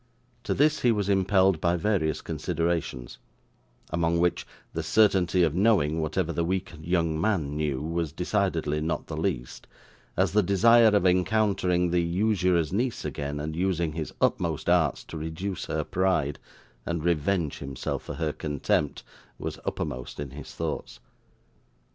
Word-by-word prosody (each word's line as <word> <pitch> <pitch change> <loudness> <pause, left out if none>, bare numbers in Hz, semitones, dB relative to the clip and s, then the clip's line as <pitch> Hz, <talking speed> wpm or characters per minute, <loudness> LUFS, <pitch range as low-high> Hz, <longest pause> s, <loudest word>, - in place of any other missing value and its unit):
To - - 0
this 150 +2 +3
he 120 - +3
was 105 -3 0
impelled 95 -2 +3
by 85 0 +2
various 85 -4 0
considerations; 80 -5 -2 0.7
among 85 0 +1
which 90 0 +1 0.3
the - - -2
certainty 95 -4 +3
of 80 -3 +2
knowing 90 -6 +2
whatever 80 +2 -1
the 85 - 0
weak 90 +1 -2
young 85 -1 0
man 80 -9 0
knew 75 -3 -1
was 85 -1 -2
decidedly 85 -3 -1
not 80 +2 -2
the - - -6
least, - - -3 0.5
as - - +2
the 105 - +4
desire 115 +5 +5
of 105 -3 +3
encountering 90 -2 +2
the 90 0 +3
usurer's 90 -2 +1
niece 120 +4 -1
again, 70 0 -4
and 80 +1 -4
using 85 -2 0
his 80 -1 -4
utmost 85 0 0
arts 80 -6 +2
to 80 - -8
reduce 80 +5 -4
her 80 0 -2
pride, 90 -6 0 0.4
and 85 +1 -3
revenge 85 -1 0
himself 70 -2 -4
for 75 - -7
her 75 0 -2
contempt, 75 -1 -1 0.3
was - - -5
uppermost 60 +2 -4
in 70 -2 -5
his 75 +2 -9
thoughts. 80 -2 -4
85 Hz, 150 wpm, -27 LUFS, 75-95 Hz, 0.7 s, desire